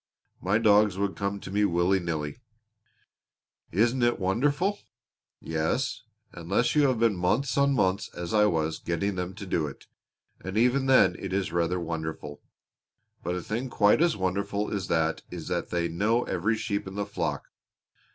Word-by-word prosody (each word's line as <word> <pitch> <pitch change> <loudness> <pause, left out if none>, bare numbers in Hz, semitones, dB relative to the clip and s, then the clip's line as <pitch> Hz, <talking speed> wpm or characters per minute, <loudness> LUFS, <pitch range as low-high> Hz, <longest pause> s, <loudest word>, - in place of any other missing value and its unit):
My 95 +3 +2
dogs 105 -3 +4
would 100 0 -1
come 100 0 -2
to - - -8
me 105 +1 +2
willy 90 0 +2
nilly." 80 -3 -3 1.3
"Isn't 120 +7 +2
it 120 0 +3
wonderful?" 145 - +1 0.6
"Yes, 80 0 -1 0.3
unless 90 +8 0
you 145 -2 +5
have 130 -3 +1
been 115 -2 +2
months 100 +10 0
and 140 0 +3
months, 95 -3 +1
as 85 +3 -5
I 105 -1 +5
was, 80 -4 -1
getting 85 +4 -1
them 90 0 -4
to 100 -1 -7
do 85 -4 0
it; 70 - -10 0.6
and 95 +2 -4
even 125 +4 +3
then 130 -1 +5
it - - -5
is 95 -3 -1
rather 85 +1 0
wonderful. 80 -3 -5 0.8
But 90 +2 -2
a 90 - -4
thing 120 +4 -3
quite 105 +4 +4
as 170 -6 +3
wonderful 100 +2 -1
as 100 -3 -2
that 80 -1 0
is - - -7
that - - -2
they 85 -1 0
know 105 +8 +1
every 105 +6 0
sheep 100 -3 -3
in 95 - -8
the 100 0 -2
flock. 100 - -3
100 Hz, 170 wpm, -27 LUFS, 85-115 Hz, 1.3 s, you